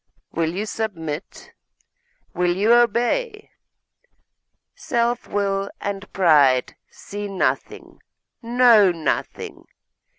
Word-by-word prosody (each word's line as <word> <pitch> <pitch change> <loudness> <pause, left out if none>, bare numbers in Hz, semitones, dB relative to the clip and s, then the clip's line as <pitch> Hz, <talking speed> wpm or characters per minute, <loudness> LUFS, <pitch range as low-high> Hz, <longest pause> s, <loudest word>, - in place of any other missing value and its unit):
Will 165 -1 -1
you 205 +3 -2
submit? 175 -8 -6 0.8
Will 175 0 0
you 215 +4 +4
obey? 245 - +1 1.2
Self 240 0 -1
will 200 -1 -1
and 200 0 -5
pride 145 -8 +3
see 205 0 -7
nothing, 195 -2 -3 0.4
know 235 -4 +5
nothing. 165 -4 -4
200 Hz, 80 wpm, -22 LUFS, 175-235 Hz, 1.2 s, know